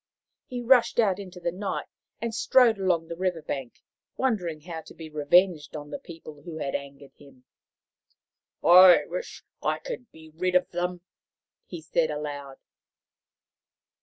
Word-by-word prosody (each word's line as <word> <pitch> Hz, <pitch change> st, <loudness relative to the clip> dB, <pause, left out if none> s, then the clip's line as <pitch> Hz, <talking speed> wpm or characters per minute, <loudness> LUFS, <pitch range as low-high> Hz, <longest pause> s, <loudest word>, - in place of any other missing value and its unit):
He 250 Hz, -1 st, -5 dB
rushed 240 Hz, -1 st, +4 dB
out 205 Hz, -4 st, +3 dB
into 185 Hz, -2 st, -9 dB
the 170 Hz, 0 st, -2 dB
night 195 Hz, +3 st, -4 dB, 0.3 s
and 230 Hz, -1 st, -3 dB
strode 235 Hz, -1 st, +4 dB
along 175 Hz, -4 st, +1 dB
the 170 Hz, -, -6 dB
river 180 Hz, -2 st, -2 dB
bank, 135 Hz, -5 st, -6 dB, 0.3 s
wondering 180 Hz, -12 st, -1 dB
how 165 Hz, 0 st, -7 dB
to -, -, -15 dB
be 160 Hz, -1 st, -10 dB
revenged 155 Hz, +2 st, +2 dB
on 145 Hz, -1 st, -7 dB
the -, -, -5 dB
people 160 Hz, -, -12 dB
who 160 Hz, +1 st, -8 dB
had 140 Hz, -3 st, -3 dB
angered 140 Hz, 0 st, -7 dB
him. 135 Hz, -3 st, -19 dB, 0.6 s
" -, -, -47 dB
I 180 Hz, +1 st, +8 dB
wish -, -, -6 dB, 0.2 s
I -, -, 0 dB
could 480 Hz, -, -8 dB
be 160 Hz, 0 st, -15 dB
rid 180 Hz, +3 st, -1 dB
of 180 Hz, -, +2 dB
them," 180 Hz, 0 st, -3 dB, 0.7 s
he 175 Hz, -3 st, -8 dB
said 160 Hz, +1 st, 0 dB
aloud. 145 Hz, -2 st, -6 dB
170 Hz, 155 wpm, -26 LUFS, 150-190 Hz, 0.7 s, I